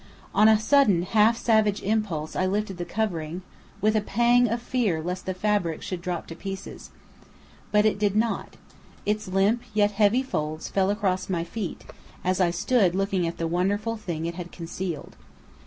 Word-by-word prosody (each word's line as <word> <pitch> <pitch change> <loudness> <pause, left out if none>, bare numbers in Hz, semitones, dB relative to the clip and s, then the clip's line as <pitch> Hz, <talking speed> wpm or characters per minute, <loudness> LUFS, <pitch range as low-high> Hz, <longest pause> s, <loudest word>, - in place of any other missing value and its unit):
On 210 +2 +6
a 220 -1 +6
sudden 215 -7 +4
half 220 +4 +3
savage 215 -4 +2
impulse 200 -8 -1
I 185 - +1
lifted 200 -1 -2
the 175 - -4
covering, 180 -5 -3 0.4
with 215 +1 +3
a 215 - +3
pang 240 +4 +3
of 235 +2 -1
fear 235 -8 0
lest 180 +4 -4
the 185 - 0
fabric 195 -5 0
should 185 -2 -4
drop 175 -1 -3
to 165 - -9
pieces. 195 +2 -7 0.8
But 210 0 +4
it 215 -2 +2
did 205 -1 +1
not. 225 +1 -1 0.5
Its 210 -1 -1
limp, 195 +5 +2
yet 205 -1 +3
heavy 210 +5 +3
folds 155 -10 -3
fell 195 -1 +1
across 195 -3 0
my 170 -3 0
feet, 185 +2 -6 0.4
as 185 +1 +1
I 180 - +4
stood 185 +1 +2
looking 195 -2 0
at 165 - -5
the 165 - -2
wonderful 200 +7 0
thing 170 -7 -4
it 170 - -2
had 175 0 -7
concealed. 170 -2 -6
195 Hz, 175 wpm, -26 LUFS, 175-215 Hz, 0.8 s, On